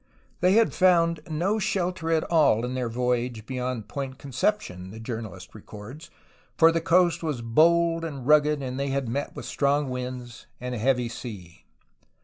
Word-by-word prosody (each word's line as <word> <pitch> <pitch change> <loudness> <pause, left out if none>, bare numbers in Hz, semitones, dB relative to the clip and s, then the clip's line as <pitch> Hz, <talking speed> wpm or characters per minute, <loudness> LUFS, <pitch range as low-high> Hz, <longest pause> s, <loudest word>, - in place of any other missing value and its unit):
They 180 +1 +4
had 225 +1 +4
found 170 -3 +3
no 180 +8 0
shelter 185 -5 -1
at 160 -1 +2
all 145 -9 +3
in 125 - -4
their 125 -2 -2
voyage 120 -1 -1
beyond 125 -3 -4
Point 135 0 -5
Conception, 130 - -2
the 110 +3 -10
journalist 110 -5 -7
records, 110 +8 -11 0.5
for 165 0 +7
the 165 0 0
coast 175 +1 +3
was 150 -8 -3
bold 165 +7 +3
and 140 -6 -6
rugged, 150 0 +4
and 130 0 -4
they 140 - -1
had 135 -2 -1
met 140 +5 -3
with - - -7
strong 140 -1 0
winds 125 -1 -6
and 125 0 -5
a 120 - -3
heavy 125 +1 +1
sea. 105 -8 -9
135 Hz, 165 wpm, -26 LUFS, 120-165 Hz, 0.5 s, for